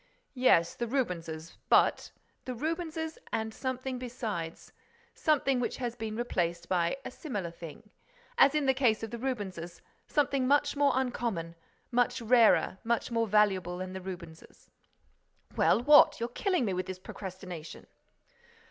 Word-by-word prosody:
"Yes, 250 -11 +4
the 240 - -3
Rubenses—but—" 170 - 0 0.4
"The 255 - -4
Rubenses 320 +3 -3
and 220 0 -2
something 260 0 -4
besides—something 255 - -3
which 245 - -2
has 240 -2 -3
been 220 -2 -5
replaced 170 -8 -1
by 175 +3 +1
a - - -5
similar 205 - -5
thing, 165 +4 -11 0.5
as 310 - +5
in 300 -2 +1
the 265 - +4
case 245 -5 +2
of 225 - -5
the 235 - -5
Rubenses; 190 -9 -4 0.3
something 275 -3 +1
much 290 +1 +3
more 285 0 +3
uncommon, 235 -10 -2 0.4
much 245 +1 +2
rarer, 230 -4 +4
much 235 +1 -1
more 230 -1 +1
valuable 190 -4 +2
than 185 0 -5
the 190 - -6
Rubenses." 170 -3 -10 0.8
"Well, 235 - +3
what? 295 +2 +7
You're 235 +1 -2
killing 365 - 0
me 195 - -1
with 185 +1 -3
this 185 - -5
procrastination!" 185 -3 -8
230 Hz, 140 wpm, -30 LUFS, 185-265 Hz, 0.8 s, what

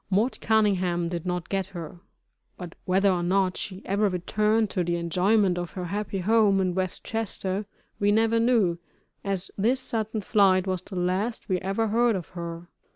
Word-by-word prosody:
"Mort 210 +6 +1
Cunningham" 185 -6 +2
did 175 0 -4
not 180 -1 -2
get 195 -2 -1
her, 175 -2 -8 0.6
but 175 -2 -8
whether 190 +2 +3
or 180 -1 0
not 185 +1 +1
she 190 -1 -6
ever 200 +2 +1
returned 210 +4 +1
to 180 - 0
the 175 0 -1
enjoyment 180 +3 +2
of 175 -1 -5
her 180 -2 -4
happy 200 +2 -3
home, 205 +1 +3
in 185 -1 +1
West 185 0 -2
Chester, 205 -3 -1 0.3
we 205 0 +3
never 225 +2 +3
knew, 225 -8 +2 0.4
as 195 -1 -3
this 240 +6 +2
sudden 220 -3 -3
flight 190 -3 +3
was 185 -2 -2
the 195 - -10
last 185 +6 -1
we 185 -1 +1
ever 195 +4 -1
heard 235 +1 +3
of 180 -4 -5
her. 170 -1 -7
195 Hz, 175 wpm, -26 LUFS, 180-215 Hz, 0.6 s, whether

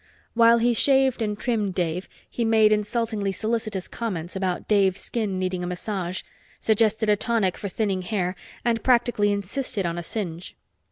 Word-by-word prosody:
While 230 0 +6
he 240 +1 +3
shaved 265 0 +3
and 210 -2 -1
trimmed 215 -5 -1
Dave, 175 0 -2 0.2
he 240 - -3
made 220 -1 +5
insultingly 210 -1 -1
solicitous 215 -1 -2
comments 185 -7 -4
about 185 -2 -2
Dave's 195 -3 +3
skin 210 -5 -2
needing 185 -1 -2
a - - -2
massage, 180 0 -3 0.4
suggested 220 0 +2
a 210 - +5
tonic 210 -4 0
for 200 - -5
thinning 195 -2 -1
hair 185 -2 -2 0.3
and 230 -1 +1
practically 240 -4 +3
insisted 205 +1 -3
on 170 0 -2
a - - -5
singe. 175 -3 -5
210 Hz, 160 wpm, -25 LUFS, 185-230 Hz, 0.4 s, While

